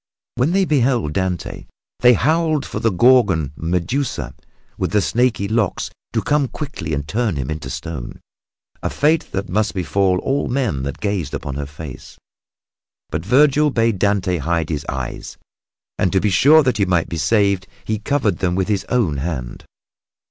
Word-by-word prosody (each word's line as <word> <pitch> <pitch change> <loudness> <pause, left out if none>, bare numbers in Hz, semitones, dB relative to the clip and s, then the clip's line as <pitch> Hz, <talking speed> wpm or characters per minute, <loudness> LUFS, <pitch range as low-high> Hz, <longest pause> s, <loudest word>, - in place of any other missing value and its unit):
When 130 +7 +1
they 195 0 +3
beheld 125 - +1
Dante 95 -1 -3 0.3
they 125 0 +6
howled 155 +2 +1
for - - -5
the 115 - +2
Gorgon, 95 - +3
Medusa, 85 - -2 0.4
with - - -3
the 105 - +4
snaky 115 -1 +1
locks 110 -2 -1 0.2
to - - 0
come 145 -2 +2
quickly 120 - -5
and 70 0 -4
turn 110 +1 0
him 65 0 -3
into 75 0 -5
stone 80 -7 -6 0.6
a - - -1
fate 155 +2 +1
that 95 +1 -3
must 105 +3 0
befall 95 +1 +1
all 140 +1 0
men 120 - -1
that 70 +1 -5
gazed 100 -8 -2
upon 70 - -5
her 70 +1 -4
face. 75 -2 -10 0.9
But - - -2
Vergil 145 +7 +4
bade 115 -6 +1
Dante 100 -3 +1
hide 85 0 -1
his 75 -3 -3
eyes, 65 -2 -5 0.6
and 90 - +2
to 95 - +4
be 105 +1 +1
sure 150 - +6
that 125 -5 +1
he 100 - +2
might 90 -2 +1
be 85 - -5
saved 100 +1 +2 0.2
he 110 -1 -1
covered 130 -2 0
them 90 -1 0
with 95 +1 -1
his 100 -2 -1
own 105 - +1
hand. 65 -5 -5
100 Hz, 170 wpm, -20 LUFS, 80-125 Hz, 0.9 s, they